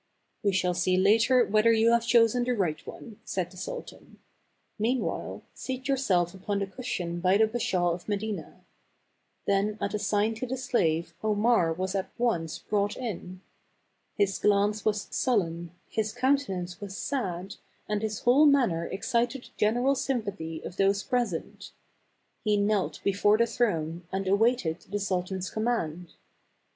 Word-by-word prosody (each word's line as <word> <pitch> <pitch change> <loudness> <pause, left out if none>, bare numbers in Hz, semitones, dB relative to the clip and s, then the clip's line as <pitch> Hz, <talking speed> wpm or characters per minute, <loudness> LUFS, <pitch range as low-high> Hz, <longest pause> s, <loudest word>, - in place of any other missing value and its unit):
" - - -46
" - - -47
We 200 - +3
shall 180 -1 +1
see 180 +1 +1
later 230 +6 +4
whether 215 +2 +4
you 225 +1 +4
have 235 0 +2
chosen 235 +1 +4
the 250 +1 0
right 170 -6 -1
one," 220 -4 -10
said 180 -2 -3
the 185 - -14
sultan; - - -8 0.6
"meanwhile, 240 +4 -1
seat 260 0 -5
yourself 195 -11 +1
upon 200 +2 -3
the 200 - 0
cushion 190 -5 -4
by 185 +2 +3
the 220 - +5
Bashaw 195 -6 0
of 175 - -8
Medina." 210 0 -4 0.8
Then 200 +2 +1
at 200 - -2
a 210 - -1
sign 205 +2 +1
to 255 - -4
the 260 +2 -3
7 255 - -7
7^^ - - -14
slave, 165 -7 +1
Omar 215 -4 +3
was 185 +3 -2
at 195 -1 -2
once 175 -10 0
brought 205 -1 -1
in. 185 -6 -6 0.8
His 200 -2 +1
glance 210 +1 +2
was 210 -1 +1
sullen, 175 -9 0 0.2
his 215 -1 -2
countenance 245 -9 0
was 200 -1 -6
sad, 195 -8 -3 0.3
and 210 -1 -1
his 215 -1 -3
whole 275 +5 +6
manner 235 - +3
excited 240 +5 -1
the - - -14
general 245 +6 +2
sympathy 200 -12 -3
of 180 - -8
those 195 +1 +2
present. 240 -10 -3 0.7
He 210 -1 +2
knelt 205 -1 0
before 200 +2 +3
the 235 - +4
throne, 175 -8 -1
and 190 0 -2
awaited 200 -4 +2
the 205 +1 -2
sultan's 185 -1 -2
command. 180 -7 -2
205 Hz, 160 wpm, -28 LUFS, 185-235 Hz, 0.8 s, whole